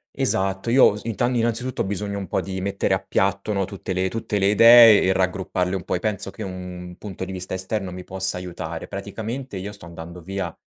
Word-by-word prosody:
Esatto, 95 +4 0
io 125 -5 +6
s 105 - -7
inta 115 +1 0
innanzitutto 120 +1 0
ho - - -5
bisogno 100 +1 -3
un 95 - -5
po' - - -1
di 95 -1 -5
mettere 100 +1 0
a - - -2
piatto, 100 +2 -1
no, 100 -1 0
tutte 95 -1 -6
le 95 +1 0
tutte 105 0 -2
le 95 - +3
idee 115 +1 +8
e 95 - +3
raggrupparle 95 0 -1
un 95 - -4
po' - - -4
e 90 - 0
penso 100 -1 -1
che - - -11
un 90 -2 -7
punto 95 -3 -6
di 95 - -7
vista 95 0 -4
esterno 95 0 -2
mi 90 0 -8
possa 95 0 0
aiutare. 85 -2 -6
Praticamente, 110 +5 -6
io 95 +2 -5
sto 100 -3 -10
andando 85 +1 -9
via 95 +3 -4
95 Hz, 220 wpm, -23 LUFS, 90-105 Hz, -, idee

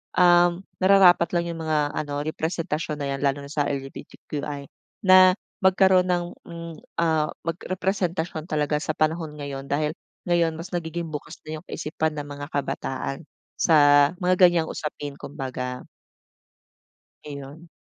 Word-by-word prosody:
um, 175 0 +5 0.2
nararapat 185 -3 +6
lang 170 -1 0
yung 165 -1 -5
mga 150 -2 +1
ano, 145 -1 -3
representasyon 155 -1 -3
na 140 - -2
'yan 135 - -7
lalo 140 0 +1
na 140 - -10
sa 150 -1 +1
LGBTQI 140 +1 -6 0.4
na 185 0 +8 0.3
magkaroon 190 -1 +5
ng, 175 -1 +1 0.2
hmm, 170 -1 -8 0.2
ah, 160 -2 +2 0.2
mag 165 0 -2
representasyon 180 -4 -2
talaga 150 -2 0
sa - - -1
panahon 155 0 0
ngayon. 140 -1 -6
Dahil 150 +2 -1 0.3
ngayon 170 -2 +2
mas 170 +4 -8
nagiging 170 -1 -3
bukas 150 -1 -7
na 155 0 -6
yung 175 - -20
kaisipan 155 0 -2
ng 145 - -6
mga 145 0 -7
kabataan 135 +1 -3 0.3
sa 145 -2 +5
mga 185 0 +2
ganyang 170 -2 +1
usapin, 145 -2 -5
kumbaga. 130 -3 -5 1.5
Ayun. 145 +3 -9
155 Hz, 140 wpm, -24 LUFS, 145-175 Hz, 1.5 s, na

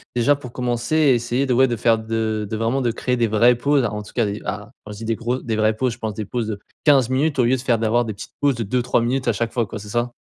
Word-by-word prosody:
déjà 130 +4 +3
pour 130 -4 -10
commencer. 120 +3 -1
Et 145 -5 +5
essayer 120 +3 0
de, 130 - +1
ouais 130 +2 +5
de 120 - -1
faire 115 0 +3
de 110 -1 -2
de 110 - -3
vraiment 115 +5 0
de 120 - +1
créer 125 +2 -1
des 115 - +2
vraies 115 +3 +4
pauses 140 +2 +2
en 105 -1 -3
tout 105 - -14
cas 120 - +1
des 100 +1 -4
ah, 105 +2 -5
quand 105 - -8
je 105 - -8
dis 115 - -7
des 115 - 0
gro 120 +3 -2
des 115 -3 -3
vraies 110 0 +2
pauses 125 +1 0
je 120 - -13
pense 110 -1 -3
des 105 +1 -5
pauses 115 +1 -3
de 105 -2 -4 0.3
15 135 -5 +5
minutes 140 +2 0
au 125 - +5
lieu 130 +2 +3
de 125 - -5
faire 120 -4 +1
d'avoir 115 +2 +2
des 110 - -4
petites 100 - -10
pauses 140 -3 +3
de 115 - -3
2-3 125 +3 +1
minutes 125 +2 -1
à 120 - +3
chaque 115 +2 -2
fois 120 -2 +1
quoi 105 - -7
c'est 105 0 -10
ça? 120 +2 -1
120 Hz, 315 wpm, -21 LUFS, 110-125 Hz, 0.3 s, Et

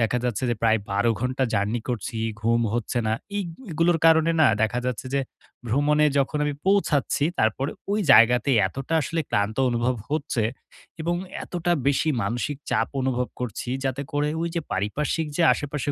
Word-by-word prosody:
দেখা 115 +2 +1
যাচ্ছে 120 -3 -1
যে, - - +1
প্রায় 110 -1 +4
১২ 100 +4 +2
ঘন্টা 130 +2 0
জার্নি 105 +4 0
করছি, 120 -1 -3 0.2
ঘুম 115 +1 +2
হচ্ছে 120 +1 -1
না। 110 - +1 0.2
এইগ 200 -3 -1 0.2
এগুলোর 165 +1 +2
কারণে 160 0 +5
না? 155 - +7 0.2
দেখা 110 +3 +1
যাচ্ছে 125 0 -3
যে, 140 - +2 0.5
ভ্রমণে 150 +5 +3
যখন 140 +2 0
আমি 145 -1 -1
পৌঁছাচ্ছি, 165 -8 +2
তারপরে 110 +6 +1 0.2
ওই 210 - +1
জায়গাতেই 120 +3 +5
এতটা 135 - -4
আসলে 165 +2 -2
ক্লান্ত 100 +2 0
অনুভব 120 +1 0 0.2
হচ্ছে 145 -5 -1 0.6
এবং 170 +2 0 0.3
এতটা 175 0 -1
বেশি 140 +3 +2
মানসিক 120 +7 -2
চাপ - - +1
অনুভব 125 -1 -1
করছি, 120 -1 -4 0.2
যাতে 135 +1 -1
করে 145 0 +1
ঐজে 170 0 -2
পারিপার্শ্বিক 150 +10 -1
যে 175 - +2
আশে-পাশে 145 0 -3
130 Hz, 160 wpm, -24 LUFS, 115-150 Hz, 0.6 s, না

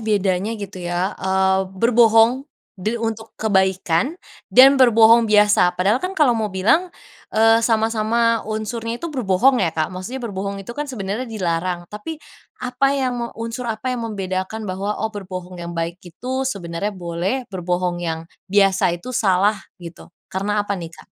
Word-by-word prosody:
bedanya 205 0 0
gitu 200 -3 -8
ya, 175 +3 -1
eee, 190 0 +1
berbohong 230 +4 +4 0.3
de 215 +5 -1
untuk 225 -1 -5
kebaikan 190 - +1 0.3
dan 265 +1 +7
berbohong 230 -1 +6
biasa. 205 -4 +4
Padahal 200 +7 +2
kan 375 +1 -4
kalau 290 -7 +4
mau 220 -2 -1
bilang, 210 - +2 0.4
eee, 225 +1 +4
sama-sama 225 0 +1
unsurnya 225 +2 -3
itu 335 +3 -6
berbohong 245 +1 +2
ya 175 - +2
Kak, 155 +3 -1
maksudnya 195 +9 -6
berbohong 200 -1 -4
itu 235 - -7
kan 295 +3 -5
sebenarnya 225 0 -4
dilarang. 175 -4 -2
Tapi, 260 +10 -6 0.5
apa 250 +2 +1
yang 260 -2 0
me 235 - -2
unsur 230 +2 -5
apa 230 +3 -2
yang 245 - -3
membedakan 195 0 -4
bahwa 200 +2 -3
oh 220 0 -2
berbohong 185 -3 -7
yang 170 0 -6
baik 170 +2 -3
itu 250 +10 -5
sebenarnya 180 -2 -3
boleh, 180 +9 -2
berbohong 180 -1 -2
yang 165 -1 -3 0.2
biasa 195 -3 +3
itu 255 +9 -8
salah, 200 -1 +2 0.2
gitu. 170 -3 -11 0.2
Karena 205 +2 0
apa 200 - -2
nih, 170 -2 -6
Kak? 160 - -16
210 Hz, 155 wpm, -21 LUFS, 185-230 Hz, 0.5 s, dan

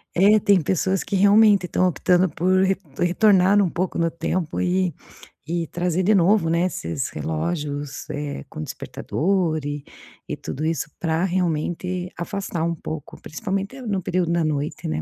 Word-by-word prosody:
É, 205 +4 +6
tem 200 -3 +4
pessoas 190 +4 0
que - - -3
realmente 205 0 +5
estão 185 +1 +1
optando 180 +2 +2
por 185 +3 +2
re 190 0 +2 0.2
retornar 190 +2 +4
um 195 - +3
pouco 180 +2 -2
no 165 -1 +1
tempo 170 -1 -2
e 180 -2 +1 0.5
e 170 0 -2
trazer 180 +1 -1
de 215 +3 +4
novo, 190 -1 +3
né, 170 +2 +2
esses 80 - -3
relógios, 145 - -4
eh, 145 - -5
com 75 - -7
despertador 165 - -1
e 145 0 -4 0.5
e - - -3
tudo 145 - -5
isso 160 -2 -1
pra 165 +1 0
realmente 180 0 -1
afastar 175 -1 -3
um 170 0 0
pouco, 155 -2 -7
principalmente 195 - -4
no 205 -5 -2
período 175 -1 0
da 170 -1 +2
noite, 150 0 -2
né? 75 0 -2
175 Hz, 160 wpm, -23 LUFS, 160-190 Hz, 0.5 s, É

